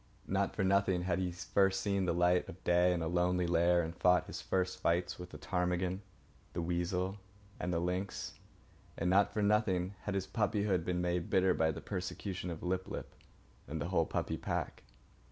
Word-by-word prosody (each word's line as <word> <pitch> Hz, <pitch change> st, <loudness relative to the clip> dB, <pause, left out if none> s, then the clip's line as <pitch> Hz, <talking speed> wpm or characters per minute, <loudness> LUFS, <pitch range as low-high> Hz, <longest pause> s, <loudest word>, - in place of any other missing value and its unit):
Not 100 Hz, +1 st, 0 dB
for 105 Hz, -, 0 dB
nothing 95 Hz, -2 st, +2 dB
had 90 Hz, -1 st, 0 dB
he 90 Hz, -1 st, -1 dB
first 95 Hz, +2 st, +1 dB
seen 100 Hz, -2 st, 0 dB
the -, -, +1 dB
light 90 Hz, +1 st, +2 dB
of 90 Hz, -, -11 dB
day 90 Hz, +1 st, +4 dB
in 85 Hz, -2 st, 0 dB
a -, -, -1 dB
lonely 90 Hz, +1 st, +2 dB
lair 85 Hz, +1 st, +3 dB
and 80 Hz, +2 st, -5 dB
fought 90 Hz, +1 st, +4 dB
his -, -, -6 dB
first 95 Hz, -1 st, -1 dB
fights 85 Hz, +2 st, 0 dB
with 90 Hz, 0 st, -7 dB
the -, -, -9 dB
ptarmigan, 90 Hz, 0 st, -1 dB, 0.5 s
the 85 Hz, -, -2 dB
weasel, 90 Hz, +3 st, -1 dB, 0.4 s
and 90 Hz, -, -2 dB
the 85 Hz, -, +1 dB
lynx. 90 Hz, +3 st, -3 dB, 0.6 s
And 90 Hz, +2 st, +1 dB
not 100 Hz, +1 st, +4 dB
for 105 Hz, -, -1 dB
nothing 100 Hz, -3 st, +2 dB
had 100 Hz, -, -1 dB
his 95 Hz, -1 st, 0 dB
puppyhood 100 Hz, -5 st, +1 dB
been 90 Hz, 0 st, -1 dB
made 90 Hz, -1 st, -1 dB
bitter 95 Hz, -1 st, +4 dB
by 80 Hz, -2 st, +2 dB
the 80 Hz, -, -4 dB
persecution 95 Hz, -1 st, -4 dB
of 85 Hz, -2 st, -6 dB
Lip 95 Hz, +1 st, -1 dB
lip -, -, -6 dB, 0.5 s
and 75 Hz, +4 st, -4 dB
the 70 Hz, -, -3 dB
whole -, -, +2 dB
puppy -, -, -2 dB
pack. -, -, -3 dB
90 Hz, 190 wpm, -34 LUFS, 90-95 Hz, 0.6 s, day